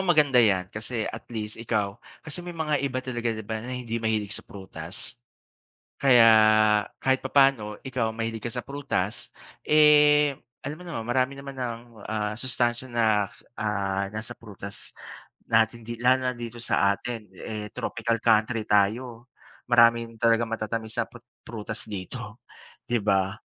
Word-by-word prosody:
maganda 145 -6 +5
'yan 95 -4 +3
kasi 110 +1 -3
at - - -6
least 110 -2 -4
ikaw, 105 -4 -1 0.3
kasi 160 +3 -5
may 175 -1 -8
mga 150 -3 0
iba 135 -2 -1
talaga 120 -2 -2
'di 110 -1 -5
ba, 110 0 -3
na 125 - -7
hindi 120 -2 -4
mahilig 110 -2 0
sa - - -5
prutas? 95 +3 -8 0.9
Kaya 125 -4 +7 0.7
kahit 130 0 +2
papaano 135 -7 +3
ikaw 125 -4 -1
mahilig 115 0 -4
ka 120 - -3
sa 125 0 -4
prutas, 120 -5 -3 0.3
eh, 150 -1 +6 0.3
alam 145 +2 -3
mo - - -10
naman 165 -11 -5
marami 130 +2 +1
naman 140 0 -8
ang 120 -3 -4 0.3
ah 105 -1 -1
sustansiya 120 +1 -1
na, 120 -1 +2 0.5
ah, 100 -2 -1
nasa 110 +3 -4
prutas 100 -3 -8 0.6
natin 115 +1 +2
di 120 0 -6
lalo 130 +2 +3
na 125 - +1
dito 120 0 -7
sa 100 -4 +2
atin, 115 -1 -6
eh 105 +2 -6
tropical 115 -1 -1
country 110 0 +3
tayo. 115 +4 +1 0.4
Marami 115 -1 +6 0.2
talagang 115 0 +3
matatamis 110 0 -3
na - - 0
prut 120 -1 -15 0.2
prutas 110 -1 -4
dito, 95 -4 -7 0.5
'di 120 0 +2
ba. 95 0 +1
115 Hz, 150 wpm, -26 LUFS, 110-130 Hz, 0.9 s, Kaya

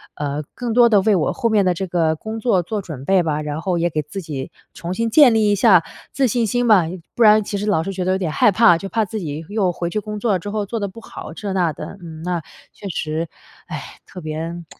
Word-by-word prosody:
呃， 145 0 -3
更 240 -3 -3
多 240 -1 +6
地 210 -3 +5
为 210 +1 +3
我 165 - +1
后 240 - -1
面 210 -2 +3
的 180 - +3
这 190 +3 -3
个 165 -2 +1
工 220 +7 -6
作 210 -6 +2
做 210 +4 -3
准 150 -8 -8
备 190 +1 +4
吧， 155 -1 -1
然 150 +1 -4
后 180 -1 -1
也 170 +1 +1
给 155 - -1
自 150 +7 -7
己 140 -5 -5 0.2
重 170 +2 -5
新 230 +2 0
建 275 -3 +7
立 215 -2 +3
一 - - +3
下 195 -5 +5 0.3
自 270 -2 +1
信 235 0 +1
心 245 +3 0
吧， 200 -7 +6 0.3
不 - - -3
然 215 0 +6
其 200 0 -4
实 205 - -3
老 195 -6 +2
是 195 - -4
觉 185 -1 -3
得 185 - +1
有 - - +1
点 180 -5 -2
害 205 - +4
怕， 210 -4 +5
就 195 +3 -6
怕 220 0 +1
自 215 +3 -5
己 155 -3 -5
又 205 -4 +1
回 170 0 -3
去 215 - -2
工 210 +1 -6
作 205 -4 +1
之 205 +4 -6
后 210 0 -2
做 225 +3 -4
得 200 - -2
不 210 +4 -11
好， 160 - -9
这 200 +4 -5
那 180 -4 +1
的， 195 - -8
嗯， 160 -2 -9
那， 175 -1 -2 0.3
确 200 - -9
实， 160 -1 -2 1.4
唉， - - -17
特 - - -16
别 - - -34
195 Hz, 285 characters per minute, -20 LUFS, 165-215 Hz, 1.4 s, 建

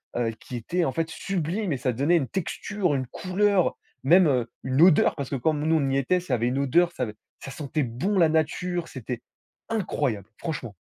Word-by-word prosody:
heu, 120 -2 0
qui 125 - -8
était, 170 +10 -1
en - - 0
fait, 165 +3 -2
sublime 185 +1 -2
et - - -1
ça 125 0 -1
donnait 145 +8 +2
une 135 - -1
texture, 190 -1 -2
une 130 - -1
couleur, 185 +5 +1 0.3
même, 145 -6 +5 0.2
une 130 +3 +1
odeur, 175 -3 +6
parce 140 -3 -4
que 140 - -2
comme 150 +4 0
nous 160 - +4
on 140 -3 +1
y 135 - +1
était, 160 +7 +2
ça 140 -8 -1
avait 115 +1 0
une 130 +3 0
odeur, 170 +6 +3
ça 130 - -3
avait 105 -2 -4 0.2
ça 135 - -8
sentait 150 0 -2
bon 135 - -1
la 165 -2 +5
nature, 165 +2 0
c'était 125 -2 -6 0.5
incroyable, 145 - -1
franchement. 130 - -5
150 Hz, 205 wpm, -26 LUFS, 130-175 Hz, 0.5 s, odeur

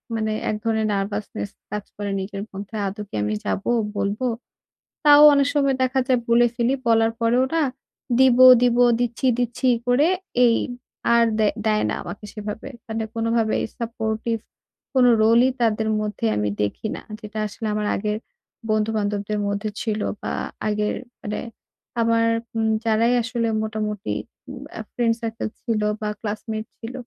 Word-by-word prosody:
মানে 220 -1 -1 0.2
এক - - 0
ধরনের 220 -1 +1
nervousness 195 - -3 0.2
কাজ 210 -1 -3
করে 205 -1 -4
নিজের 195 +1 -5
মধ্যে। 200 +2 -8
আদৌ 200 +3 -5
কি - - -8
আমি 105 +1 -1
যাবো? 195 - -1 0.3
বলবো? 205 +6 -1 0.8
তাও 290 0 +8
অনেক 280 -1 +3
সময় 275 -2 +3
দেখা 260 +1 +1
যায় 255 -2 +3
বলে 235 +1 +5
ফেলি। 240 +2 +1
বলার 225 0 +4
পরেও 235 +2 +3
না 325 - +3 0.6
দিব, 260 -2 +6 0.2
দিব, 245 -1 +3 0.2
দিচ্ছি, 245 +2 -1
দিচ্ছি 245 +2 -1 0.2
করে 260 +6 +4 0.4
এই 230 -1 +4 0.6
আর 235 - +5
দে 215 - +4 0.2
দেয় 215 -1 +2
না - - -1
আমাকে 210 - -8
সেভাবে। 210 +4 -6 0.2
মানে 220 0 -2
কোনভাবেই 230 -1 +1
সাপোর্টিভ 225 -1 -2 0.6
কোন 260 -2 +5 0.2
রোলই 230 +4 +5
তাদের 220 -1 +1
মধ্যে 210 - -3
আমি 105 0 0
দেখি 105 - -2
না। - - -7 0.2
যেটা 215 -1 -7
আসলে 220 +2 -6
আমার 210 0 -1
আগের 210 +1 -1 0.5
বন্ধু 215 0 +2
বান্ধবদের 205 0 -1
মধ্যে 200 +1 -2
ছিল 215 -2 -1 0.2
বা - - -3 0.4
আগের 210 0 0 0.3
মানে 210 0 -4 0.6
আমার 230 0 +3 0.3
উম 220 -1 +1 0.2
যারাই 225 +2 +3
আসলে 235 -1 -1 0.2
মোটামুটি 215 -1 -3 0.4
উম - - -8 0.2
আ - - -2
ফ্রেন্ড 235 -2 +1
সার্কেল 225 -1 -3
ছিল 225 -3 -1 0.2
বা 210 - -1
ক্লাসমেট 215 +1 -4
ছিল। 230 +2 -7
220 Hz, 155 wpm, -23 LUFS, 210-235 Hz, 0.8 s, তাও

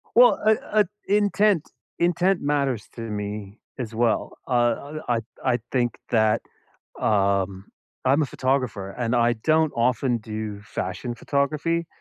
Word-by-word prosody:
Well, 245 +1 +7
uh 220 - +7 0.2
uh, 210 -1 +5 0.2
intent 205 -3 +3 0.3
intent 175 +2 +2
matters 140 -6 0
to - - -6
me 105 -1 -5 0.2
as 115 -3 -5
well. 115 0 0
Uh, - - -11
uh, 125 +5 +1
I 120 -1 +2 0.3
I 120 - +2
think 120 -2 +1
that, 110 -2 +3 0.6
um 100 -2 +1 0.4
I'm 140 +4 +4
a - - +2
photographer, 130 -7 -1
and 115 +2 -2
I 120 0 +4
don't 155 -1 +3
often 120 +1 +2
do 105 -1 -5
fashion 100 +3 -4
photography. 155 +6 0
120 Hz, 135 wpm, -24 LUFS, 110-155 Hz, 0.6 s, Well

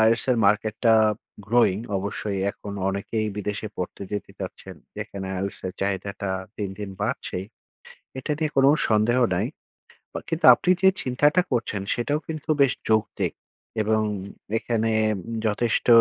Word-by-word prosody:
IELTS 115 0 +4
এর 125 - +3
market 105 +1 +2
টা 115 - +7 0.5
growing 110 -3 +3 0.2
অবশ্যই 100 0 -3
এখন 100 0 -9 0.2
অনেকেই 100 +3 -2
বিদেশে 105 +1 -3
পড়তে 90 +2 -5
যেতে 105 - -4
চাচ্ছেন - - -7 0.2
যেখানে 95 -1 -5
IELTS 100 +1 -3
এর 90 - -4
চাহিদাটা 100 0 -2 0.3
দিন, 100 -2 -3
দিন 100 -2 -5
বাড়ছেই, 105 -4 -2 0.7
এটা 135 - -5
নিয়ে 155 -1 0
কোনো 135 0 +6 0.2
সন্দেহ 110 +3 +3 0.2
নাই - - 0 0.7
বা - - -3
কিন্তু - - 0
আপনি - - -1
যে 190 - +7
চিন্তাটা 145 +7 +3
করছেন 115 -5 -1
সেটাও 145 +5 0
কিন্তু 155 -1 -6
বেশ 135 - +5 0.2
যৌক্তিক, 110 0 +1 0.5
এবং 110 +1 +2 0.6
এখানে 115 -1 0 0.3
ব - - -6 0.3
যথেষ্ট 110 +3 +1
110 Hz, 140 wpm, -25 LUFS, 100-120 Hz, 0.7 s, টা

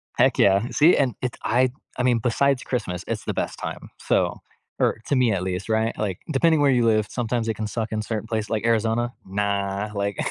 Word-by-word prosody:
Heck - - +3
yeah, 100 +4 +4
see? 160 +4 +5
And 135 -4 +2
if 125 - -1
I 125 +3 +3 0.3
I 125 - 0
mean, 125 -2 +3
besides 125 +3 +1
Christmas, 90 -8 -3
it's - - -3
the - - -2
best - - -3
time. - - -6
So, - - +1 0.4
er, - - +2
to 145 - +1
me 125 -3 +3
at 95 -3 -1
least, 90 +2 -3
right? 110 +1 0
Like, 100 -4 -2
depending 160 +2 +3
where 140 -1 +4
you 120 -2 +3
live, 110 -2 +3
sometimes 120 -1 -2
it 110 - -1
can 110 0 -3
suck 110 0 -3
in 110 0 -1
certain 110 0 -4
place- 110 -2 -2
like 110 0 -1
Arizona? 115 +1 +1
Nah. 100 +1 -2
Like 100 0 -2
110 Hz, 215 wpm, -24 LUFS, 105-125 Hz, 0.4 s, see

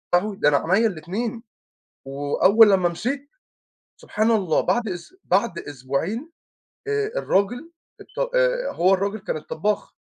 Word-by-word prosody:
يا - - +6
لهوي 205 0 -5
ده 150 - +3
أنا 145 - +3 0.2
عينيا 225 +3 +4
الإتنين." 215 +7 -4 0.6
وأول 145 +11 +4
لمّا 185 -3 +3
مشيت، 270 +11 -4 0.7
سبحان 220 +2 -1
الله 190 -8 +2
بعد 240 -3 0
أس 180 - -7
بعد 185 -2 +1
أسبوعين 145 - -4 0.6
آآ 425 0 -1
الراجل 245 - 0 0.3
الط - - -11 0.2
آآ - - +1
هو 185 +3 +3
الراجل 200 +3 -1
كان 175 - -4
الطبّاخ 200 +7 -3
200 Hz, 135 wpm, -23 LUFS, 175-240 Hz, 0.7 s, يا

